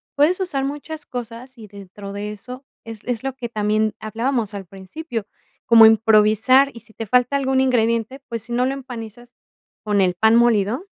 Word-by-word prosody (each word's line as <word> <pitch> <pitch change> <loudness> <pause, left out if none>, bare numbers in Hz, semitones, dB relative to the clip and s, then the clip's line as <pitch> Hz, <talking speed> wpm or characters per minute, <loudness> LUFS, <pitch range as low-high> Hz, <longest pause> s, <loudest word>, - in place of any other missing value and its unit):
puedes 300 +6 +3
usar 320 -8 -2
muchas 295 +2 -6
cosas, 245 +1 -8
y 215 -2 -11
dentro 200 0 -10
de 205 +1 -5
eso, 250 +5 -9 0.2
es 225 -2 -9
es 245 -1 -3
lo 270 -1 -3
que 240 -3 -6
también 215 0 0
hablábamos 225 0 -2
al 200 -1 -7
principio, 200 - -7 0.4
como 225 -1 +8
improvisar, 220 +4 +4
y 230 - -11
si 220 0 -16
te 225 - -6
falta 250 +4 +2
algún 265 -1 +1
ingrediente, 230 0 0
pues 230 -2 -5
si, 240 - -5
no 250 +1 +1
lo 265 - -1
empanizas 240 -3 -9 0.5
con 205 -2 +1
el 180 -1 +2
pan 220 +5 +3
molido, 235 - +2
230 Hz, 180 wpm, -21 LUFS, 215-260 Hz, 0.5 s, como